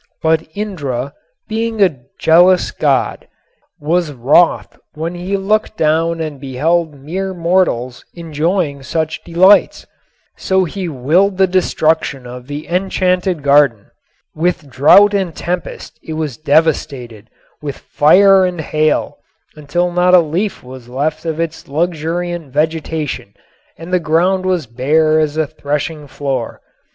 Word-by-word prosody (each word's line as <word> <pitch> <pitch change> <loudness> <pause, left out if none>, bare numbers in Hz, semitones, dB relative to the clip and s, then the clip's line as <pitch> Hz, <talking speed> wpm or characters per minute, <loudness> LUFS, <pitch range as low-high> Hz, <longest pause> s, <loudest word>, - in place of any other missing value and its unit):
But 160 0 +1
Indra, 140 - -4 0.3
being 225 0 -3
a 180 -10 +2 0.2
jealous 180 +3 +4
god, - - -1 0.5
was 165 +1 0
wroth 145 +6 +2 0.2
when 165 +3 -4
he 180 +3 -3
looked 215 +2 -1
down 165 +2 +1
and 155 -4 -5
beheld 155 +4 -1
mere 190 +7 -4
mortals 165 -8 0
enjoying 165 -2 -2
such 155 +4 -3
delights. 185 +4 +3 0.5
So 190 -1 +1
he 185 +1 -5
willed 165 +8 +1
the 190 - +5
destruction 160 -7 0
of 125 0 -10
the 145 +1 -6
enchanted 180 -2 0
garden. 140 -7 +3 0.4
With 160 -3 -2
drought 200 +11 +6
and 190 -5 -1
tempest 175 -2 -5
it 160 - -7
was 155 -5 -3
devastated, 140 -8 -1 0.3
with 145 -2 -5
fire 190 +5 +4
and 180 -2 -2
hail, 155 0 -1 0.4
until 155 +4 -2
not 180 +1 +4
a - - +8
leaf 175 +6 -2
was 125 -1 -12
left 150 +5 -2
of 160 -1 -3
its 165 -1 -4
luxuriant 170 0 -3
vegetation 155 -6 -3 0.4
and 165 +3 -9
the 180 - +4
ground 180 +4 +1
was 180 -5 0
bare 155 +7 +1
as 155 -1 -1
a 160 - +1
threshing 150 +1 -4
floor. 135 -4 -4
160 Hz, 130 wpm, -16 LUFS, 145-180 Hz, 0.5 s, a